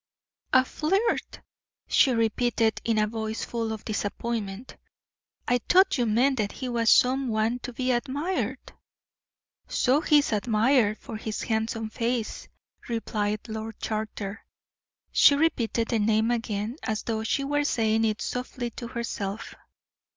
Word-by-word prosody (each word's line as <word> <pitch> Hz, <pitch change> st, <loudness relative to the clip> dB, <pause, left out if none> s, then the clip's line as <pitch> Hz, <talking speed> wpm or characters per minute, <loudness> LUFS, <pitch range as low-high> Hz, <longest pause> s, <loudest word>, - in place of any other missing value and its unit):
"A 255 Hz, 0 st, +5 dB
flirt!" 390 Hz, -, -1 dB, 0.5 s
she 270 Hz, -, +4 dB
repeated, 230 Hz, -1 st, +1 dB
in 230 Hz, -1 st, +1 dB
a 215 Hz, -, +4 dB
voice 220 Hz, 0 st, -4 dB
full 230 Hz, -2 st, -3 dB
of 220 Hz, -1 st, -6 dB
disappointment. 215 Hz, +1 st, -3 dB, 0.7 s
"I 245 Hz, 0 st, +3 dB
thought 370 Hz, -5 st, +5 dB
you 240 Hz, -, +2 dB
meant 255 Hz, +5 st, +3 dB
that 205 Hz, -1 st, -1 dB
he 255 Hz, -, -5 dB
was 230 Hz, -1 st, +1 dB
some 260 Hz, +1 st, +4 dB
one 225 Hz, +2 st, 0 dB
to 250 Hz, -, -6 dB
be 255 Hz, +1 st, -1 dB
admired." 260 Hz, -, -2 dB, 0.9 s
"So 270 Hz, +4 st, +2 dB
he 300 Hz, -2 st, +4 dB
is 285 Hz, -5 st, +2 dB
admired, 220 Hz, +1 st, +2 dB
for 220 Hz, -, -8 dB
his 215 Hz, 0 st, -4 dB
handsome 220 Hz, 0 st, -2 dB
face," 235 Hz, 0 st, -2 dB, 0.4 s
replied 215 Hz, -2 st, -1 dB
Lord 220 Hz, 0 st, -6 dB
Charter. 215 Hz, -1 st, -4 dB, 0.7 s
She 285 Hz, -, +6 dB
repeated 240 Hz, -7 st, +1 dB
the 230 Hz, -, +1 dB
name 220 Hz, +2 st, +2 dB
again, 225 Hz, 0 st, -2 dB
as 215 Hz, -1 st, -2 dB
though 220 Hz, -1 st, -2 dB
she 275 Hz, +5 st, 0 dB
were 290 Hz, +1 st, 0 dB
saying 225 Hz, -5 st, +1 dB
it 215 Hz, -1 st, 0 dB
softly 250 Hz, -1 st, -4 dB
to 235 Hz, -, -7 dB
herself. 225 Hz, -4 st, -4 dB
230 Hz, 140 wpm, -26 LUFS, 220-255 Hz, 0.9 s, She